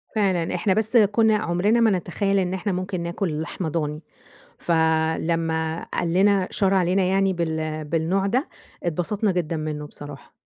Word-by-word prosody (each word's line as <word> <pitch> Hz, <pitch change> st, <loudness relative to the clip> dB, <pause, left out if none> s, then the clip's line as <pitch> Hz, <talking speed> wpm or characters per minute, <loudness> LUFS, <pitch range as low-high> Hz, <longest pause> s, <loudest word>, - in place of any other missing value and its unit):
فعلًا، 185 Hz, -5 st, +1 dB
إحنا 190 Hz, +2 st, +1 dB
بس 220 Hz, +4 st, +2 dB
كنا 220 Hz, +1 st, +4 dB
عمرنا 205 Hz, +3 st, +1 dB
ما 230 Hz, -2 st, +4 dB
نتخيل 195 Hz, +2 st, 0 dB
إن 185 Hz, -1 st, -1 dB
إحنا 195 Hz, +2 st, -2 dB
ممكن 185 Hz, 0 st, -3 dB
ناكل 170 Hz, -2 st, -2 dB
لحمة 165 Hz, +1 st, -4 dB
ضاني، 150 Hz, -1 st, -3 dB, 0.6 s
فلمّا 160 Hz, 0 st, 0 dB
قال 170 Hz, -1 st, -1 dB
لنا 195 Hz, 0 st, +3 dB
شار 195 Hz, -1 st, +1 dB
علينا 185 Hz, 0 st, +2 dB
يعني 195 Hz, +1 st, +2 dB
بال 160 Hz, -2 st, -3 dB
بالنوع 165 Hz, +5 st, 0 dB
ده، 255 Hz, -, 0 dB, 0.3 s
اتبسطنا 185 Hz, +5 st, 0 dB
جدًا 170 Hz, -3 st, -2 dB
منه 150 Hz, -1 st, -4 dB
بصراحة. 145 Hz, -1 st, -11 dB
180 Hz, 150 wpm, -23 LUFS, 160-195 Hz, 0.6 s, كنا